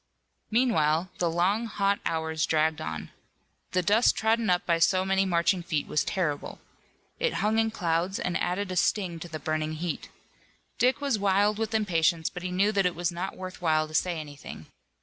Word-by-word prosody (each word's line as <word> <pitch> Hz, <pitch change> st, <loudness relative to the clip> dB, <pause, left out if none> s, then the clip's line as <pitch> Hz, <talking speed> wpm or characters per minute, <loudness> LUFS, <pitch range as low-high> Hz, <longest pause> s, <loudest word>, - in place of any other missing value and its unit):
Meanwhile 185 Hz, -8 st, +2 dB
the 175 Hz, -, +2 dB
long, 190 Hz, +7 st, +1 dB
hot 200 Hz, -1 st, 0 dB
hours 160 Hz, -1 st, -1 dB
dragged 155 Hz, 0 st, +1 dB
on. 80 Hz, 0 st, -5 dB, 0.6 s
The 185 Hz, -, +2 dB
dust 210 Hz, +7 st, +4 dB
trodden 220 Hz, 0 st, +1 dB
up 180 Hz, 0 st, +2 dB
by 170 Hz, -1 st, +2 dB
so 185 Hz, +2 st, +3 dB
many 195 Hz, 0 st, +2 dB
marching 175 Hz, +1 st, +2 dB
feet 165 Hz, -4 st, -2 dB
was 150 Hz, -, 0 dB
terrible. 150 Hz, -6 st, -2 dB, 0.6 s
It -, -, 0 dB
hung 220 Hz, +1 st, +2 dB
in 225 Hz, 0 st, +2 dB
clouds 180 Hz, -2 st, -1 dB
and 180 Hz, -, -2 dB
added 185 Hz, +2 st, -1 dB
a -, -, -3 dB
sting 180 Hz, -1 st, 0 dB
to 175 Hz, -, -8 dB
the 155 Hz, -, -5 dB
burning 155 Hz, 0 st, -2 dB
heat. 165 Hz, +1 st, -4 dB, 0.7 s
Dick 255 Hz, +3 st, +2 dB
was 275 Hz, -7 st, 0 dB
wild 205 Hz, +2 st, +2 dB
with 225 Hz, 0 st, -1 dB
impatience, 170 Hz, -5 st, +1 dB
but 180 Hz, -, -7 dB
he 185 Hz, -, -3 dB
knew 195 Hz, +3 st, +2 dB
that 195 Hz, -3 st, +2 dB
it 180 Hz, -, -3 dB
was 175 Hz, 0 st, -1 dB
not 175 Hz, +3 st, -5 dB
worth 185 Hz, -1 st, -8 dB
while 155 Hz, -2 st, +2 dB
to 155 Hz, -, -13 dB
say 170 Hz, +1 st, 0 dB
anything. 145 Hz, -, -9 dB
180 Hz, 190 wpm, -27 LUFS, 160-205 Hz, 0.7 s, dust